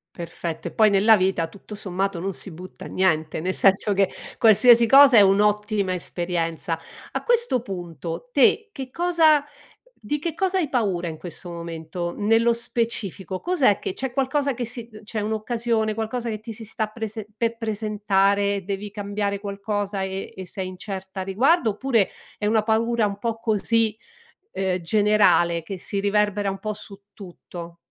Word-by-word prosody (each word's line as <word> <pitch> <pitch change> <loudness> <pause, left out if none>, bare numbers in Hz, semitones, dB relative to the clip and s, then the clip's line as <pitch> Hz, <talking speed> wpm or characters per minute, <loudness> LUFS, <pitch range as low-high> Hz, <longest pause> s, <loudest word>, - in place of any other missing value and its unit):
Perfetto 170 -1 -5
e - - -12
poi 215 -1 +4
nella 205 +3 +6
vita 185 -3 +1
tutto 200 +4 -11
sommato 195 -2 -2
non 195 +2 -3
si 195 - -7
butta 180 +3 -10
niente, 160 -5 0
nel 185 +3 -2
senso 200 +1 +3
che 195 -1 +2 0.3
qualsiasi 235 +1 +6
cosa 270 +1 +8
è 210 - +9
un'ottima 205 0 +2
esperienza. 170 -2 -2 0.3
A - - -3
questo 470 - +2
punto 175 - -6
te 295 - +3
che 265 -6 -7
cosa 330 -2 +3 0.6
di 295 +8 -1
che 325 +1 -3
cosa 380 +2 0
hai 320 -6 0
paura 195 -9 0
in 160 - -6
questo 175 +2 -7
momento, 170 +1 -5
nello 225 +3 +3
specifico 225 -5 -3
cos'è 290 - +2
che - - -4
c'è 265 +1 -4
qualcosa 275 +2 0
che 245 -1 -4
si 235 0 -6
uhm, 215 0 -12
c'è 215 +1 -4
un'occasione, 220 +1 -1
qualcosa 225 +2 -3
che 215 -2 -4
ti 225 +1 -8
si 225 +1 -8
sta 220 0 -2
prese 220 -1 -6
per 230 +1 -1
presentare, 200 -2 +1
devi 200 +2 -4
cambiare 205 0 -3
qualcosa 200 0 -3
e 190 0 -5
e 190 - -6
sei 190 +1 -4
incerta 190 0 -7
a - - -1
riguardo 235 - +3
oppure 225 -1 +1 0.3
è - - -6
una 215 +1 +3
paura 225 0 +1
un 200 - -3
po' 230 0 -2
così, 225 0 +1 0.6
ehm, 190 -1 -1
generale 190 -3 +3
che 190 +3 -7
si 200 +2 -3
riverbera 205 0 +1
un 195 - -5
po' 215 0 -4
su 200 -1 -11
tutto? 175 -3 -10
210 Hz, 165 wpm, -23 LUFS, 190-230 Hz, 0.6 s, è